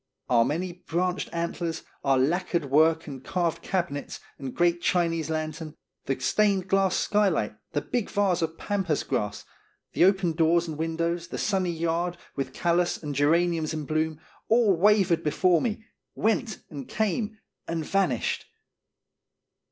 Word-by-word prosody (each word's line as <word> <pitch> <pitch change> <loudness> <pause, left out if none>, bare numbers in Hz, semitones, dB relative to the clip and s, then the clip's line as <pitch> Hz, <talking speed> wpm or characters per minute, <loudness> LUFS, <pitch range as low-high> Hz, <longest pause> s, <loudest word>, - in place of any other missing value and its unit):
Our 120 -2 +5
many 175 +8 -2
branched 180 +2 -1
antlers, 170 -1 -3 0.2
our 135 -1 +3
lacquered 165 +1 0
work 160 +2 +4
and 135 -3 -8
carved 175 -3 -1
cabinets 155 -7 -3 0.2
and 135 -2 -6
great 175 0 +2
Chinese 165 -3 +1
lantern, 155 0 -4 0.3
the 135 - -1
stained 190 +8 +2
glass 195 -1 +2
skylight, 190 - +1 0.2
the 145 - 0
big 240 +4 -2
vase 195 -4 +1
of 165 0 -2
pampas 195 -7 -1
grass, 105 0 -2 0.5
the - - +5
open 190 -2 +3
doors 165 +1 +3
and 160 - -4
windows, 170 +1 -1
the - - -6
sunny 190 -3 0
yard, 170 +1 -1 0.2
with 135 -2 -3
callas 175 +3 0
and 145 -1 -3
geraniums 160 +2 +2
in 155 -1 -4
bloom, 155 +1 -1 0.3
all 225 -4 +4
wavered 190 -2 +4
before 170 +3 +3
me, 220 -1 -2 0.3
went 220 -1 0
and 140 -4 -7
came 220 +1 -1 0.3
and 165 -2 -2
vanished. 185 - 0
170 Hz, 145 wpm, -27 LUFS, 155-185 Hz, 0.5 s, Our